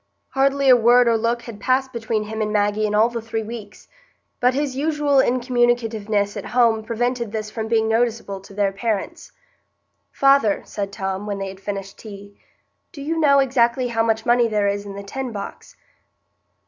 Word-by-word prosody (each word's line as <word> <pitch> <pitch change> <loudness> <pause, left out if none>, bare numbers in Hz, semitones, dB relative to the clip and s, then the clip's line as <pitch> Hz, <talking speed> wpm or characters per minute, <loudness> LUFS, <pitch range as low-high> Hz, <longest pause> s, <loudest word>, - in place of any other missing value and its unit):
Hardly 275 +1 +1
a 255 - +8
word 240 +1 +5
or 230 - +4
look 235 +1 -1
had 225 -3 -9
passed 260 +1 +1
between 225 -2 -2
him 220 +1 -5
and 210 0 -1
Maggie 210 0 +1
in 210 - -1
all 215 +2 +5
the 235 -1 -5
three 225 0 -4
weeks; 215 -2 -9 0.5
but 250 +1 +2
his 280 -2 -1
usual 295 0 +1
incommunicativeness 240 -5 +1
at - - -6
home 225 -3 +4
prevented 235 0 -2
this 215 -1 -4
from 220 -1 -4
being 220 -1 +2
noticeable 225 -3 -1
to 195 - -15
their 200 -1 +1
parents. 220 - -4 0.8
"Father," 275 -7 +3
said 200 -1 -5
Tom, 195 0 -4
when 200 -1 -3
they 195 0 -4
had 190 0 -11
finished 195 -1 -6
tea, 200 -2 -11 0.6
"do - - -12
you 320 +4 -2
know 285 -3 +5
exactly 250 -2 +2
how 225 -1 0
much 225 -1 0
money 240 -1 +4
there 210 -2 0
is 200 0 -2
in 200 - -8
the 200 - -7
tin 255 +5 -5
box?" 210 - -8
225 Hz, 185 wpm, -21 LUFS, 210-250 Hz, 0.8 s, a